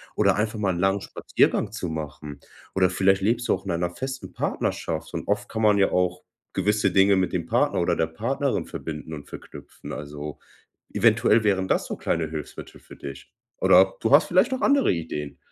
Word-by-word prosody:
oder -, -, +3 dB
einfach 110 Hz, +1 st, -1 dB
mal 100 Hz, -3 st, +1 dB
'n 85 Hz, -, -4 dB
langen 95 Hz, +2 st, +1 dB
Spaziergang -, -, 0 dB
zu 90 Hz, -, -4 dB
machen. 75 Hz, -2 st, -6 dB, 0.4 s
Oder 95 Hz, -1 st, +4 dB
vielleicht 95 Hz, +1 st, +2 dB
lebst 115 Hz, +4 st, 0 dB
du -, -, +5 dB
auch 95 Hz, +1 st, -11 dB
in 95 Hz, -, -2 dB
einer 85 Hz, +1 st, -1 dB
festen 130 Hz, +7 st, -6 dB
Partnerschaft. -, -, -3 dB
Und -, -, -5 dB
oft 105 Hz, 0 st, -1 dB
kann 110 Hz, 0 st, -3 dB
man 105 Hz, -1 st, +5 dB
ja 100 Hz, -, +3 dB
auch 90 Hz, 0 st, 0 dB, 0.3 s
gewisse 105 Hz, +3 st, +1 dB
Dinge 95 Hz, 0 st, +4 dB
mit 95 Hz, -1 st, 0 dB
dem 85 Hz, -3 st, -1 dB
Partner -, -, +1 dB
oder -, -, +1 dB
der 80 Hz, -, +1 dB
Partnerin 125 Hz, +11 st, -2 dB
verbinden 80 Hz, 0 st, -7 dB
und 75 Hz, -2 st, -8 dB
verknüpfen. -, -, -11 dB
Also, 75 Hz, 0 st, -7 dB, 0.5 s
eventuell 115 Hz, +1 st, +4 dB
wären 95 Hz, -3 st, +1 dB
das -, -, +1 dB
so -, -, -5 dB
kleine 80 Hz, -2 st, -1 dB
Hilfsmittel 75 Hz, -2 st, -8 dB
für -, -, -14 dB
dich. 70 Hz, -1 st, -9 dB, 0.3 s
Oder 95 Hz, +1 st, +5 dB
du 115 Hz, -, 0 dB
hast 145 Hz, +3 st, +7 dB
vielleicht 190 Hz, +9 st, +3 dB
auch 260 Hz, -, -3 dB
andere 280 Hz, -1 st, +3 dB
Ideen? 75 Hz, -4 st, -5 dB
95 Hz, 195 wpm, -25 LUFS, 80-110 Hz, 0.5 s, hast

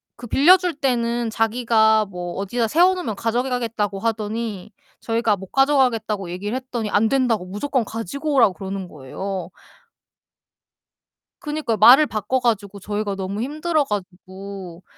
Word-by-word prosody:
그 240 Hz, -, -10 dB
빌려줄 355 Hz, +6 st, +4 dB
때는 235 Hz, -4 st, -1 dB
자기가 220 Hz, -1 st, +2 dB
뭐 180 Hz, -2 st, -6 dB
어디다 225 Hz, +4 st, -1 dB
세워 355 Hz, +8 st, +4 dB
놓으면 250 Hz, -, -4 dB
가져가겠다고 230 Hz, -3 st, -1 dB
하더니 220 Hz, -2 st, -3 dB, 0.3 s
저희가 225 Hz, -2 st, +1 dB
못 190 Hz, 0 st, -10 dB
가져가겠다고 240 Hz, -9 st, +1 dB
얘기를 205 Hz, +6 st, -4 dB
했더니 240 Hz, -5 st, -4 dB
안 220 Hz, +2 st, +3 dB
된다고 245 Hz, -8 st, +1 dB
무조건 250 Hz, +7 st, -1 dB
가지고 275 Hz, -, -4 dB
오라고 225 Hz, -7 st, +5 dB
그러는 195 Hz, -1 st, -6 dB
거예요. 175 Hz, +6 st, -6 dB, 1.9 s
그니까 295 Hz, -7 st, -2 dB
말을 255 Hz, +9 st, +8 dB
바꿔 220 Hz, +2 st, -1 dB
가지고 205 Hz, -5 st, -1 dB
저희가 205 Hz, 0 st, -3 dB
너무 195 Hz, +3 st, -4 dB
힘들어 310 Hz, +3 st, 0 dB
가지고 190 Hz, -3 st, -7 dB
220 Hz, 330 characters per minute, -22 LUFS, 200-250 Hz, 1.9 s, 말을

